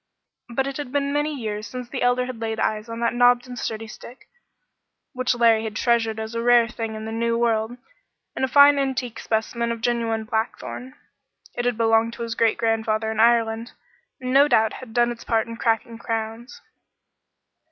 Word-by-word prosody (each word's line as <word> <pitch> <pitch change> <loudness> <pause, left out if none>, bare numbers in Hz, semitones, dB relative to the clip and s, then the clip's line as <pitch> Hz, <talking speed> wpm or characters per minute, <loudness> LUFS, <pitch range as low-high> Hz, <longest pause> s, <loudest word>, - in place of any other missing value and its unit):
But 265 +3 -1
it 275 -1 -4
had 290 -4 -6
been 280 0 0
many 295 +1 0
years 215 -1 -4
since 250 -1 -7
the 255 +1 -5
Elder 245 0 +2
had 250 -3 -7
laid 220 -1 -3
eyes 215 +1 -1
on 230 0 -5
that 235 - +1
knobbed 245 0 +4
and 250 - -7
sturdy 225 -2 -4
stick, 240 +3 -12 0.9
which 255 -1 0
Larry 230 -2 +4
had 220 -2 -5
treasured 225 -2 +1
as 220 +1 -5
a 230 - -2
rare 240 -1 +5
thing 225 -2 -5
in 215 0 -6
the 220 - -5
new 230 +1 0
world, 230 0 0 0.6
and - - -3
a - - +3
fine 285 +1 +6
antique 260 -3 -2
specimen 235 +1 -1
of 230 - -2
a - - -17
genuine 230 -2 0
blackthorn. 225 +4 -4 0.6
It 245 - -3
had 245 -2 0
belonged 225 0 +2
to 235 - -6
his 230 -1 -3
great 230 -1 +2
grandfather 220 -1 0
in 220 - -4
Ireland, 230 0 +2 0.5
and 255 -1 -3
no 280 +2 +6
doubt 220 -6 +3
had 255 -3 -10
done 240 +1 +2
its 235 - -8
part 225 -2 +1
in 230 - -7
cracking 230 0 -1
crowns. 225 +3 -5
235 Hz, 195 wpm, -23 LUFS, 225-245 Hz, 0.9 s, fine